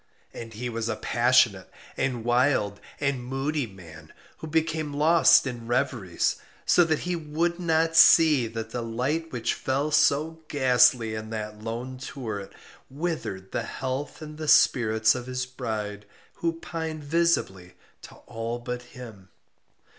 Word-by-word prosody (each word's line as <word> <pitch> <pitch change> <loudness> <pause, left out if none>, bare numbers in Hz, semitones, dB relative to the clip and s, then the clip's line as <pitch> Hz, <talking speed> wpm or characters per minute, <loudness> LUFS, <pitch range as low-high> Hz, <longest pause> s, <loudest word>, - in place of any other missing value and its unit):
And 115 -2 -9
he 125 +3 -4
was 115 -1 -3
a - - -1
passionate, 120 -5 +2 0.3
and 130 -4 -2
wild, 120 -5 +2 0.2
and 140 -3 -1
moody 135 +2 -2
man, 80 -6 -14 0.3
who 160 - -8
became 160 -2 -1
lost 160 +2 +5
in 120 -3 -6
reveries; 120 -8 0 0.3
so 175 - +5
that 160 -2 0
he 180 0 -2
would 165 +2 -2
not 165 -1 +1
see 155 -7 +6
that 110 0 -6
the 120 - -3
light 130 +8 -2
which 120 -2 -1
fell 140 +3 -1
so 150 +2 +2
ghastly 125 -4 +3
in 110 0 -6
that 105 -1 -6
lone 120 +3 -5
turret 110 -7 -6 0.4
withered 140 - -4
the - - -1
health 135 +4 -5
and 150 0 -10
the 155 - -4
spirits 110 -5 +4
of 125 -1 -6
his 125 0 -3
bride, 105 -5 -5 0.3
who 165 -1 -2
pined 160 -2 -5
visibly 145 - 0 0.3
to - - -13
all 115 0 -4
but 125 0 -5 0.2
him. 110 -7 -11
125 Hz, 145 wpm, -26 LUFS, 115-155 Hz, 0.4 s, see